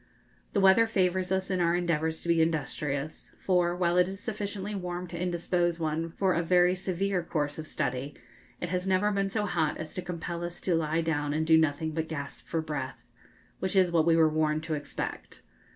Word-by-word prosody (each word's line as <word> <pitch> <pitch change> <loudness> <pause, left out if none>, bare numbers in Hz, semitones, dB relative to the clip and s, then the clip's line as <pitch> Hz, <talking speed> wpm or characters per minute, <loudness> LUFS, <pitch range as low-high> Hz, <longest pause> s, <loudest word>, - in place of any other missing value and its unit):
The 200 - +2
weather 195 +4 +6
favours 185 -3 +1
us 190 0 0
in 185 -1 +1
our 170 0 +3
endeavours 160 -2 0
to - - -7
be 170 -1 +4
industrious; 150 -2 -2
for, 175 -2 +1
while 175 -1 +1
it 180 - +4
is 195 0 -6
sufficiently 205 -2 -4
warm 180 -2 -4
to 175 - -7
indispose 175 -1 0
one 160 +1 -1
for 185 +2 +1
a 170 - +1
very 180 +1 +4
severe 185 +1 -1
course 150 -3 -2
of 155 - -6
study, 130 +2 -2 0.4
it 175 - -3
has 180 +1 -2
never 190 +2 +3
been 195 -1 0
so 210 +1 -1
hot 160 -6 0
as 155 0 -7
to 185 - -3
compel 175 -1 -5
us 175 0 -5
to 185 - 0
lie 165 0 +1
down 145 -3 -1
and 160 +1 0
do 160 0 +6
nothing 160 0 +2
but 160 0 -2
gasp 140 -3 -6
for 165 - -1
breath 145 -4 -5 0.5
which 190 +2 -2
is 185 -2 +4
what 165 -1 +3
we 165 - +5
were 160 -1 +6
warned 155 0 +1
to 160 - -3
expect. 145 -1 -5
170 Hz, 205 wpm, -29 LUFS, 160-185 Hz, 0.5 s, weather